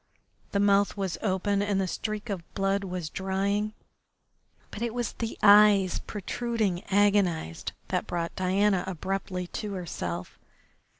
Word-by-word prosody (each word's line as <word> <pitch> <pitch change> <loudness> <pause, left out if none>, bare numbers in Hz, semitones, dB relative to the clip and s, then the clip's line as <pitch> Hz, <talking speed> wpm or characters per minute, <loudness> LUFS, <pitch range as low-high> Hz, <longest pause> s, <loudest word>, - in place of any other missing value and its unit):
The 200 - +1
mouth 200 0 +3
was 190 -3 -2
open 200 0 +1
and 205 -1 +1
the 190 - 0
streak 215 +3 -3
of 180 -4 -6
blood 195 0 +1
was 180 -3 -4
drying, 200 +4 -1 1.0
but - - -7
it 235 0 -2
was 240 -2 -2
the 225 -1 -4
eyes, 205 -2 +7
protruding, 210 -2 -2
agonised, 195 - +1 0.2
that - - -1
brought 170 -1 -3
Diana 190 +1 +2
abruptly 190 +1 -3
to 205 +3 -5
herself. 90 - -5
195 Hz, 130 wpm, -28 LUFS, 185-205 Hz, 1.0 s, eyes